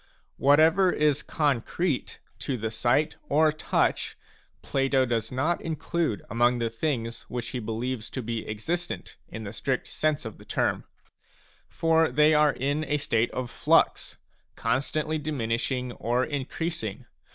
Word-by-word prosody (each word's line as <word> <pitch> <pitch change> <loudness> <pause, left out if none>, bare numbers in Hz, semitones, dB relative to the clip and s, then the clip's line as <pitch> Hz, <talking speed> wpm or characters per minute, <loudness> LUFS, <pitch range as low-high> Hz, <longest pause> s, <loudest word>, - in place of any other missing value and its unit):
Whatever 160 +6 +5
is 150 -2 +2
concrete 145 +2 -1 0.2
to 135 - -2
the 110 0 -3
sight 125 +7 +1
or 155 +2 +4
touch, 155 - 0 0.5
Plato 135 -1 +2
does 115 -2 -1
not 150 +7 0
include 165 -5 -2
among 120 +1 +2
the 115 -1 -1
things 115 -2 -2
which 120 -1 -4
he 125 - -3
believes 115 +1 -3
to 130 - -5
be 115 -1 -4
existent 170 +12 -3
in 110 +1 -7
the 100 0 -6
strict 130 +4 -1
sense 155 -4 -1
of 110 - -7
the - - -12
term. - - -1
a - - -46 0.8
For 165 -1 +3
they 150 +1 +4
are 150 0 +5
in 140 +4 -1
a 150 +1 +1
state 120 -5 +1
of 125 -2 -4
flux, - - +2 0.4
constantly 150 +6 0
diminishing 125 -3 -1
or 120 +2 0
increasing. 145 - -4
135 Hz, 140 wpm, -27 LUFS, 115-155 Hz, 0.8 s, Whatever